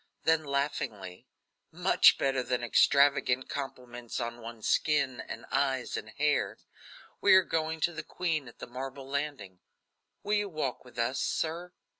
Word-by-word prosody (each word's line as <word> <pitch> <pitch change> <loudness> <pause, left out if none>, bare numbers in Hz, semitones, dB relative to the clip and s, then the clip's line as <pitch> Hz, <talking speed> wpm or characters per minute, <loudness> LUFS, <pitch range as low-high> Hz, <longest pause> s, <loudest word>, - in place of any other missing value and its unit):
Then 160 -1 +3
laughingly: 130 -10 -3 0.4
"Much - - +5
better 135 -1 +1
than 125 0 -2
extravagant 140 0 +3
comments 125 -4 -6
on 120 0 -4
one's 115 -1 -7
skin, 140 -5 +1
and - - -7
eyes, 135 -2 0
and - - -5
hair. - - 0 0.6
We 200 - +6
are 190 - +7
going 160 -1 -2
to 175 - +1
the - - -4
queen 160 -6 -2
at 120 - -13
the - - -7
marble 130 +2 -7
landing. 140 -10 -4 0.6
Will 210 - -1
you 205 -1 +1
walk 150 -7 -3
with 125 -1 -16
us, 120 +3 0
sir?" 170 +2 -2
135 Hz, 150 wpm, -30 LUFS, 125-155 Hz, 0.6 s, are